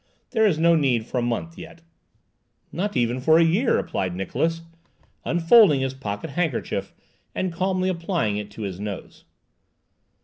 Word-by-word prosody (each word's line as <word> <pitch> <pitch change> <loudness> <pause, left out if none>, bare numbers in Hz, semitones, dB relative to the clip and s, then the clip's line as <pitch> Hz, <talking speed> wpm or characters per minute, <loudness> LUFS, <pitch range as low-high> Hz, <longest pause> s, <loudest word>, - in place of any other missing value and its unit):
There 220 -3 +3
is 170 -7 +1
no 170 +1 +4
need 130 -7 +1
for 125 - -2
a - - 0
month 120 +8 -3
yet." 165 - -11 0.9
"Nor 195 +4 -2
even 120 +1 0
for 160 +4 +5
a 165 - +5
year," 195 +10 +2
replied 90 -2 -2
Niklausse, 165 - -2 0.6
unfolding 170 - +5
his 135 0 -2
pocket 130 +2 -6
handkerchief 160 -4 -2 0.4
and 185 -2 -2
calmly 185 +1 0
applying 170 - -1
it 105 0 -5
to 105 +1 -8
his 95 -2 -5
nose. 100 -2 -7
160 Hz, 150 wpm, -23 LUFS, 115-175 Hz, 0.9 s, for